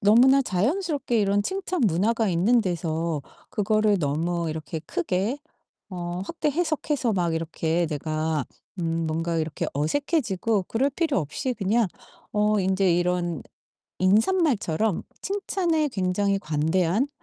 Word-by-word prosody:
너무나 250 +7 +6
자연스럽게 265 - 0
이런 200 0 +2
칭찬 370 - -2
문화가 210 +5 +1
있는 195 +8 +3
데서 165 -4 -1 0.3
그거를 215 0 +2
너무 165 +3 -1
이렇게 160 +1 -5
크게 190 - -1 0.5
어 175 -1 -4
확대 320 +1 -1
해석해서 300 -6 0
막 175 -3 0
이렇게 165 +1 -1
내가 155 0 -1 0.4
음 165 -1 -1
뭔가 165 +1 -1
이렇게 155 -1 -2
어색해지고 215 - 0
그럴 245 +9 0
필요 305 - +1
없이 155 - -3
그냥 215 +1 +1 0.5
어 210 0 +2
인제 190 -1 +2
이런 175 -3 0 0.6
인사말처럼 220 - +2 0.2
칭찬에 360 -6 0
굉장히 195 -1 0
관대한 170 - +1
195 Hz, 280 characters per minute, -25 LUFS, 165-240 Hz, 0.6 s, 너무나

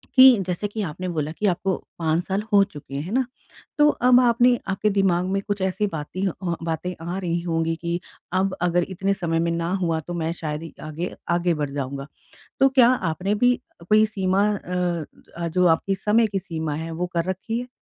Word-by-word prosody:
कि 260 -1 +9
जैसे 180 +3 -1
कि 210 +1 -5
आपने 185 +1 -4
बोला 155 -3 -2
कि 210 - -4
आपको 190 +1 +1 0.2
5 160 0 +1
साल 195 +2 -1
हो 200 -1 +7
चुके 145 -6 -9
हैं, 140 - -1
है 180 - -7
ना। 260 +1 +2 0.5
तो 295 0 +6
अब 250 -3 +5
आपने 245 0 +4
आपके 195 +2 +1
दिमाग 190 -3 +2
में 195 +1 0
कुछ 205 -1 -2
ऐसी 190 +2 0
बातें 155 +4 -5
अ, 180 -1 -3
बातें 165 +2 -2
आ 175 +2 -3
रही 175 -3 -1
होंगी 165 -1 0
कि, 170 +1 -3 0.3
अब 190 +1 +1
अगर 175 0 +2
इतने 195 +1 0
समय 165 -4 -1
में 170 0 +1
ना 170 +1 -1
हुआ 165 -2 +1
तो 165 +3 -7
मैं 165 -1 -1
शायद 155 -2 -4
ही 165 - -9
आगे 155 +4 -4 0.2
आगे 175 0 +2
बढ़ 150 -3 -2
जाऊँगा। 140 0 -4 0.5
तो 270 - +7
क्या 260 -3 +5 0.2
आपने 190 +5 -1
भी 245 +3 +3 0.3
कोई 215 0 +6
सीमा 195 -1 +1
अ 180 -3 -2 0.3
अ, 170 -1 -1
जो 180 +2 +2
आपकी 170 +4 +2
समय 210 +4 +3
की 200 -2 -2
सीमा 160 -5 -4
है 160 +2 -4
वो 175 +2 -2
कर 170 -1 +1
रखी 210 +5 -3
है? 250 - -7
180 Hz, 210 wpm, -24 LUFS, 165-200 Hz, 0.5 s, कि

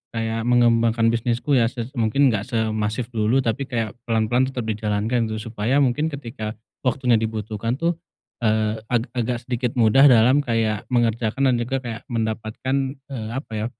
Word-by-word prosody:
kayak 115 0 -2
mengembangkan 115 -1 +3
bisnisku 120 +4 -1
ya 115 - +3
ses 120 0 -6
mungkin 125 +5 +3
nggak 110 0 -2
semasif 110 0 -1
dulu 115 +4 +1
tapi 130 +4 -1
kayak 115 -3 -3
pelan-pelan 115 +3 +2
tetap 130 -2 -4
dijalankan 110 +2 -1
gitu 110 +1 -5
supaya 115 +4 0
mungkin 140 +4 +1
ketika 115 -7 -6 0.3
waktunya 125 -3 +2
dibutuhkan 110 +1 -3
tuh, 170 +3 -1 0.4
eee, 110 -1 +1
ag 120 -1 +1
agak 120 0 -2
sedikit 120 -1 -2
mudah 120 +4 +6
dalam 125 +2 +5
kayak 115 -5 -1
mengerjakan 120 +2 +1
dan - - +2
juga 130 +3 -2
kayak 115 +1 -7
mendapatkan, 110 +1 -2 0.4
eee, 110 -4 -5
apa 135 -2 -6
ya, 110 0 -2
115 Hz, 155 wpm, -22 LUFS, 110-125 Hz, 0.4 s, mudah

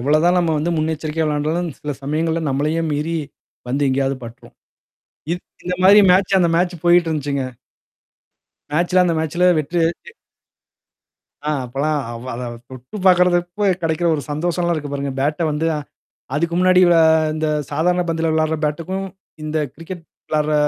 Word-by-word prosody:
எவ்வளோதான் 155 +7 +3
நம்ம 170 -2 +1
வந்து 165 +3 -1
முன்னெச்சரிக்கையா 155 0 -1
விளையாண்டாலும் 155 +3 -1
சில 150 - -4
சமயங்கள்ல 160 +3 -1
நம்மளையே 150 +5 0
மீறி 155 +3 -1 0.5
வந்து 135 +3 -1
எங்கேயாவது 135 +1 0
பட்ரும். 115 0 -12 0.8
இது 175 - -1 0.3
இந்த 180 0 -1
மாதிரி 200 +3 +8
மேட்ச் 190 +1 +3
அந்த 175 -2 +3
மேட்ச் 175 0 0
போயிட்டு 175 0 +5
இருந்துச்சுங்க. 140 -3 -2 1.3
மேட்சல 175 +4 +2
அந்த 175 -2 +1
மேட்சல 175 +3 +2
வெற்றி. 165 +4 -2 1.7
ஆ - - +2
அப்பலாம் 145 +5 -1
அவ 120 +1 -7
அத 120 +2 -5 0.3
தொட்டு 130 - -9
பார்கிறப்போ 180 +2 +3 0.2
கெடைக்கிற 165 +1 0
ஒரு 145 - -4
சந்தோஷம்லாம் 170 +3 0
இருக்கு 145 -2 -5
பாருங்க. 140 0 -3
பேட்ட 150 +4 0
வந்து 150 +2 -1
அ. - - -2 0.6
அதுக்கு 170 +3 0
முன்னாடி 185 0 +5
விள 170 -1 +5 0.4
இந்த 155 0 -1 0.2
சாதாரண 175 +5 +1
பந்துல 165 0 0
விளையாடுற 160 0 +1
பேட்டுக்கும், 175 +6 -3 0.4
இந்த 155 +1 -2 0.2
கிரிக்கெட் 165 +2 -9 0.2
விளையாடுற 155 0 0
160 Hz, 140 wpm, -20 LUFS, 150-175 Hz, 1.7 s, மாதிரி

